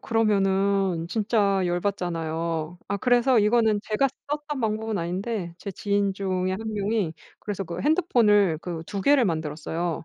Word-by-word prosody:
그러면은 195 -5 +1
진짜 200 -2 +1
열 175 0 0
받잖아요. 165 -3 -2
아 200 - 0
그래서 245 +2 +3
이거는 215 -1 +3
제가 220 +6 +1 0.2
썼던 295 -2 -3
방법은 220 -1 -1
아닌데 180 +1 -3
제 200 - -6
지인 200 +1 0
중에 185 -1 -1
1 190 - -3
명이 205 -4 -1 0.3
그래서 200 -2 -4
그 170 +1 -6
핸드폰을 210 - +3
그 170 -3 -5
2 200 -1 -4
개를 275 +4 +4
만들었어요. 160 0 -2
200 Hz, 305 characters per minute, -25 LUFS, 175-220 Hz, 0.3 s, 개를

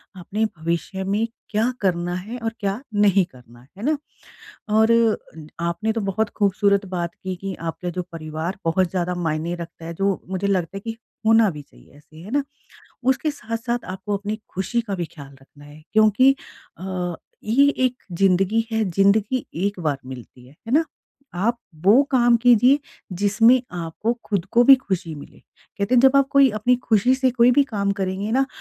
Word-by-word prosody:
अपने 190 +4 -3
भविष्य 170 +4 -3
में 205 +4 0 0.2
क्या 220 +4 +1
करना 175 -2 0
है 210 +7 -6
और 225 0 -2
क्या 200 +2 -2
नहीं 200 -2 +4
करना 120 -4 -18 0.2
है 205 - -8
ना? 305 +1 +2 0.7
और 220 +2 +4 0.7
आपने 170 +6 -1
तो 225 - -2
बहुत 205 +2 -1
खूबसूरत 200 0 +2
बात 175 -2 -4
की 185 -1 -5
कि 195 +1 -6
आपके 165 +2 -4
जो 180 - -3
परिवार 160 +2 -5
बहुत 170 +2 +2
ज़्यादा 180 -1 -1
मायने 165 -1 -2
रखता 170 -1 -9
है 165 - -5
जो 195 +1 -1
मुझे 190 +1 -2
लगता 190 -2 -1
है - - -4
कि 225 0 -5 0.3
होना 225 -1 +5
भी 150 -2 -8
चाहिए 140 - -21
ऐसे 155 +1 -19
है 180 +7 -10
ना, 285 +1 +1 0.6
उसके 265 +4 +1
साथ-साथ 235 -2 -4
आपको 190 +2 -3
अपनी 205 +2 -4
खुशी 195 +6 -1
का 215 -4 -4
भी 175 -2 -2
ख़याल 140 -4 -13
रखना 145 +2 -18
है 145 +1 -14
क्योंकि 215 +5 +5 0.4
अ, 180 -1 -3 0.3
ये 270 +6 +4 0.2
एक 250 0 -5
ज़िंदगी 195 +5 +2
है, 220 0 +1
ज़िंदगी 200 +7 +2
एक 195 +2 -2
बार 150 -4 -1
मिलती 125 -1 -11
है, 130 - -17
है 225 - -4
ना? 315 +4 +4 0.5
आप 225 +7 0 0.3
वो 220 +8 +7
काम 240 -3 +4
कीजिए 245 +3 +5 0.3
जिसमें 205 +7 +4 0.2
आपको 170 +7 -2
खुद 200 -5 -1
को 240 +1 +6
भी 275 - +10
खुशी 190 -10 -4
मिले, 145 - -12 0.4
कहते 200 +5 +1
हैं 245 - +6
जब 265 0 +7
आप 275 -1 +4
कोई 275 -1 +6
अपनी 245 +4 +3
खुशी 225 +3 +3
से 260 0 +2
कोई 240 0 +4
भी 280 +3 +4
काम 200 -6 -2
करेंगे 190 +2 -2
ना 270 +2 +2
200 Hz, 180 wpm, -22 LUFS, 175-230 Hz, 0.7 s, भी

